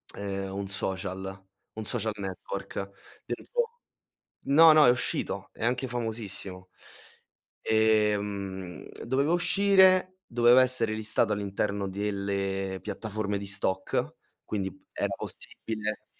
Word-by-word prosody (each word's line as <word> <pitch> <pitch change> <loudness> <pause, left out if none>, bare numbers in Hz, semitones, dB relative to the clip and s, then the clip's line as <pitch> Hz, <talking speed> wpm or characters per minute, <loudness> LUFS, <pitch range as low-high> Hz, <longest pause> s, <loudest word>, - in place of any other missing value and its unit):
ehm, 95 -1 -4
un 100 0 -3
social, 95 0 -4 0.3
un 110 -1 -6
social 110 +1 -1
network 95 -2 -6 0.5
dentro - - -5 0.9
no, 160 +3 +8
no, 155 -1 +7
è - - +7
uscito, 125 -1 -1
è - - -7
anche 125 +2 0
famosissimo. 110 -6 -4 0.9
Ehm, 105 -5 +1 0.2
doveva 135 +6 +2
uscire, 185 0 +4
doveva 120 +1 +6
essere 125 -4 0
listato 110 0 +1
all'interno 100 0 -2
delle 100 -1 -2
piattaforme 105 0 -3
di 100 - -6
stock, 95 -1 -1 0.3
quindi 95 -2 -2 0.2
era - - -1
possibile 105 -1 -4
105 Hz, 105 wpm, -28 LUFS, 95-120 Hz, 0.9 s, no